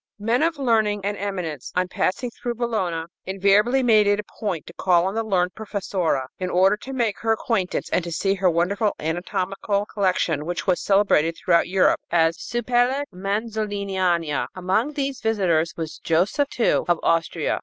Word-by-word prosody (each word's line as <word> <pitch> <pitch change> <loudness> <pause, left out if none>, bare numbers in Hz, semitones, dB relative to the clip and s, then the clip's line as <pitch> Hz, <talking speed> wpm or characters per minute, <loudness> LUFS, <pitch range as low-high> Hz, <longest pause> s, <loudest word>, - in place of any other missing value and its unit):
Men 230 +4 0
of 330 -1 +1
learning 220 -6 +1
and 205 0 -1
eminence, 180 -9 -4
on 180 0 +1
passing 235 +6 -1
through 240 +1 -5
Bologna, 195 -9 -2 0.2
invariably 200 +7 +3
made 215 -4 +5
it 205 0 +3
a - - -3 0.2
point 190 -7 -3
to 170 - -11
call 175 -1 +2
on 190 - -1
the 225 - 0
learned 185 -4 0
professora 195 -9 -2
in 185 -1 -2
order 190 +3 +4
to 265 - -9
make 235 -6 -1
her 225 - 0
acquaintance 215 -4 -1
and 180 - +1
to 170 - -6
see 195 +4 +1
her 190 -1 +2
wonderful 200 +5 0
anatomical 190 +5 -2
collection, 185 -7 0
which 175 0 -3
was 185 -3 +1
celebrated 195 -5 +2
throughout 170 -2 +2
Europe 185 0 +3
as 165 -1 +3
Supellex 245 +3 0
Manzoliniana. 195 - -1
Among 190 +10 0
these 275 -2 -3
visitors 180 -7 +1
was 160 -2 -5
Joseph 190 - +1
II 230 - +2
of 175 -2 +2
Austria. 165 -1 0
195 Hz, 165 wpm, -23 LUFS, 175-220 Hz, 0.2 s, made